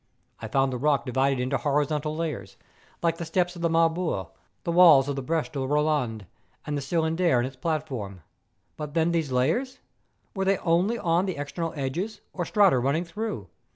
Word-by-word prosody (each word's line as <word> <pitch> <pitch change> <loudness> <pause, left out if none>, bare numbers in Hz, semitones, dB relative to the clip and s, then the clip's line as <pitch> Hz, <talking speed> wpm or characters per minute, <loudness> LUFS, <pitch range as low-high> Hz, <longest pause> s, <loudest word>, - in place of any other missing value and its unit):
I - - -4
found 135 -1 +1
the 125 - -3
rock 145 0 +2
divided 135 +1 +1
into 130 +2 0
horizontal 150 +3 0
layers, 160 -2 -4 0.5
like 165 -1 +1
the - - -3
steps 175 +2 0
of 170 - -8
the 170 - +2
Marbore, 165 - +1 0.3
the 170 - -1
walls 165 -6 +7
of 140 - -2
the 135 - -3
Breche 160 +4 -1
de 140 - -4
Boland, 135 -6 0 0.4
and 150 - -2
the 145 - -2
Cylindre 165 0 +1
and 120 - +1
its 130 0 -7
platform. 130 - -3 0.6
But 150 0 -6
then 165 +1 +2
these 165 -5 -1
layers? 160 - 0 0.6
Were 195 - -1
they 195 0 +2
only 180 +7 +1
on 175 0 +1
the 185 - -3
external 145 +4 -3
edges 160 +10 -3
or 175 - -2
strata 195 - +4
running 140 +7 0
through 170 - -5
155 Hz, 185 wpm, -26 LUFS, 135-170 Hz, 0.6 s, walls